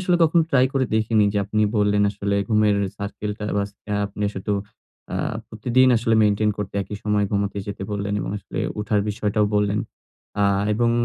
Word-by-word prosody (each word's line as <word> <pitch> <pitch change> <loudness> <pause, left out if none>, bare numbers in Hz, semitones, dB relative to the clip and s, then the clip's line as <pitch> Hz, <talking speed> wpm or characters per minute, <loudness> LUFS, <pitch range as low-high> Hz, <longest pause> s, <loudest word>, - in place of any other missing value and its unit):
আসলে 180 -1 +2
কখনো 165 +1 +4
ট্রাই 130 -2 +5
করে 135 -1 +2
দেখিনি 110 -1 +3
যে 105 - +1
আপনি 105 +2 0
বললেন 105 0 +3
আসলে 100 0 -2
ঘুমের 105 -2 +3 0.2
সার্কেলটা 105 +1 -5
বা 100 - +2 0.4
আপনি 105 +1 -4
শুধু 95 +2 -2 0.6
আ - - -2 0.3
প্রতিদিন 130 +1 +3
আসলে 115 0 +1
মেইনটেইন 105 0 +3
করতে 105 -2 -4
একই 105 - -7
সময়ে 105 -1 +1
ঘুমাতে 100 0 -1
যেতে 100 -1 -5
বললেন 100 0 -2
এবং - - -4
আসলে 100 - -8 0.2
উঠার 105 0 +1
বিষয়টাও 105 0 0
বললেন 105 0 +2 0.6
আ - - +4 0.3
এবং 115 +2 +2
105 Hz, 170 wpm, -23 LUFS, 100-110 Hz, 0.6 s, ট্রাই